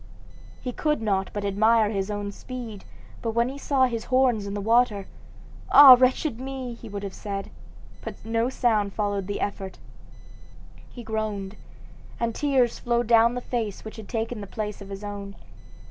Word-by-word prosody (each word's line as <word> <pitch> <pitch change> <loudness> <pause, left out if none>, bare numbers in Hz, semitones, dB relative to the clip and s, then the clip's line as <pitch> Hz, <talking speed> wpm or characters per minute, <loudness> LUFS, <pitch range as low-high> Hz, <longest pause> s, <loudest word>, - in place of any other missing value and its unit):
He 250 - -2
could 300 +4 0
not 195 -3 0
but 205 -1 -4
admire 215 +2 +3
his 195 -1 -2
own 205 -1 -3
speed; 230 -3 -8 0.4
but 225 -1 -2
when 235 +1 +2
he 275 +2 -7
saw 275 -2 +2
his 230 -3 -3
horns 250 -5 +2
in 200 - -4
the - - -2
water, 220 -1 +2 0.7
"Ah, 280 -2 +11
wretched 255 0 +1
me!" 265 -2 -5
he 230 -1 -11
would 200 0 -6
have 195 -2 -5
said, 195 0 -5 0.5
but - - -9
no 230 +2 0
sound 215 -6 +1
followed 205 -3 -1
the 205 - -3
effort. 195 -2 -4 1.1
He 240 - -10
groaned, 215 -3 -3 0.6
and 235 -1 -1
tears 265 -4 +1
flowed 240 0 0
down 230 +1 +5
the 250 - -3
face 225 -6 -4
which 220 - -8
had 215 -2 -10
taken 225 -1 -3
the 200 - -7
place 210 +1 -5
of 200 - -9
his 195 +1 -7
own. 200 -1 -6
220 Hz, 175 wpm, -25 LUFS, 205-245 Hz, 1.1 s, Ah